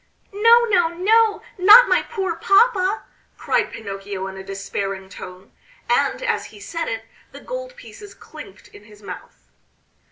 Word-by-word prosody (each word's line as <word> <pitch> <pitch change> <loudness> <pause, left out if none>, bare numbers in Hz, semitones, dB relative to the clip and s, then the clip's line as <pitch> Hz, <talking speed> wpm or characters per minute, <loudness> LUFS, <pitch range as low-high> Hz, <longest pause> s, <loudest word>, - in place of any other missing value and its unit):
"No, 460 +4 +5
no, 360 -7 +2
no, 430 +4 +2 0.2
not 430 +7 +8
my - - +2
poor 385 -7 -4
papa!" 395 +1 +2 0.3
cried - - -1
Pinocchio 195 -2 -7
in 190 0 -7
a 190 - -9
despairing 195 0 -5
tone; 185 0 -12 0.4
and - - 0
as 465 -2 -1
he 210 - -14
said 330 +11 -5
it, 225 0 -4 0.3
the - - -10
gold - - -7
pieces 425 -4 -13
clinked 295 -11 -13
in 205 - -16
his 210 -1 -18
mouth. 60 - -12
335 Hz, 150 wpm, -21 LUFS, -, 0.4 s, not